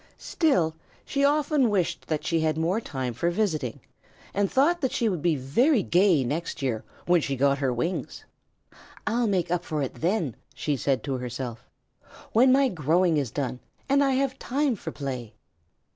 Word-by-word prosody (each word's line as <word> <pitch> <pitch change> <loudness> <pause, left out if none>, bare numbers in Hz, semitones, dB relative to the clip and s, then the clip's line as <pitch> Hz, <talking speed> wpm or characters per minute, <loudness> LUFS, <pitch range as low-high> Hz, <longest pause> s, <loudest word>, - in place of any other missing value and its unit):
Still, 185 - +1 0.3
she 280 0 -1
often 290 -2 +3
wished 190 -5 -1
that 155 -2 -2
she 165 -2 +1
had 155 -1 0
more 175 +7 0
time 130 - -4
for 170 +9 0
visiting, 165 - -1 0.5
and 200 -1 0
thought 330 +6 +3
that 260 - 0
she 235 - 0
would 180 -7 -1
be 170 -1 +2
very 205 - +2
gay 175 -5 +3
next 150 +3 -3
year, 115 -5 -1 0.2
when 175 -1 +4
she 140 -2 -2
got 140 +1 +2
her 135 -2 +1
wings. 165 +10 -3 0.8
"I'll 230 +2 +1
make 185 -4 0
up 175 -1 0
for 155 -4 -2
it 130 - -4
then," 170 - -1 0.2
she 150 - -1
said 135 0 0
to 135 -2 -2
herself, 125 -1 -6 0.6
"when 255 +4 +5
my 270 +1 +5
growing 170 - +2
is 140 -5 0
done 130 -1 -3 0.3
and 280 +1 +4
I 270 -1 +2
have 265 0 0
time 275 0 0
for 165 -5 -6
play." 130 -7 -5
170 Hz, 175 wpm, -26 LUFS, -, 0.8 s, when